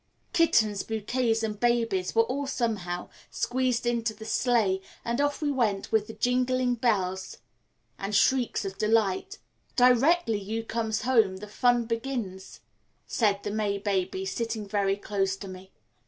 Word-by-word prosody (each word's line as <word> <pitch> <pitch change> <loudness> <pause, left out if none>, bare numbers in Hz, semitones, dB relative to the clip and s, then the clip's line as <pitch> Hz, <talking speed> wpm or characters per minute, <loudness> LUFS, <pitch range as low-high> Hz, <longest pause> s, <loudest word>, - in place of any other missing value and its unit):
Kittens, 220 - +3
bouquets, 225 +1 -1
and 210 -2 -3
babies 230 -6 +1
were 225 - +6
all 275 +4 -3
somehow 205 -9 -2 0.2
squeezed 255 -1 0
into 230 -2 0
the 220 +1 -10
sleigh, 220 -5 +2 0.2
and 235 +4 0
off 290 +1 0
we 290 - +1
went 215 -7 0
with 220 0 0
jingling 250 0 +2
bells 190 -6 -1 0.6
and 200 +1 -2
shrieks 245 -1 +2
of 195 0 -6
delight. 220 - +1 0.4
"Directly 250 0 +4
you 220 +3 -4
comes 225 -1 -2
home 225 -7 +3
the 210 +2 -9
fun 240 +2 +2
begins," 230 -5 -4 0.4
said 205 -3 +1
the 205 - -3
May 205 -1 0
baby, 190 -1 -1
sitting 220 +1 -3
very 195 -1 +1
close 195 -2 -1
to 195 - -8
me. 185 0 -10
220 Hz, 140 wpm, -27 LUFS, 200-245 Hz, 0.6 s, were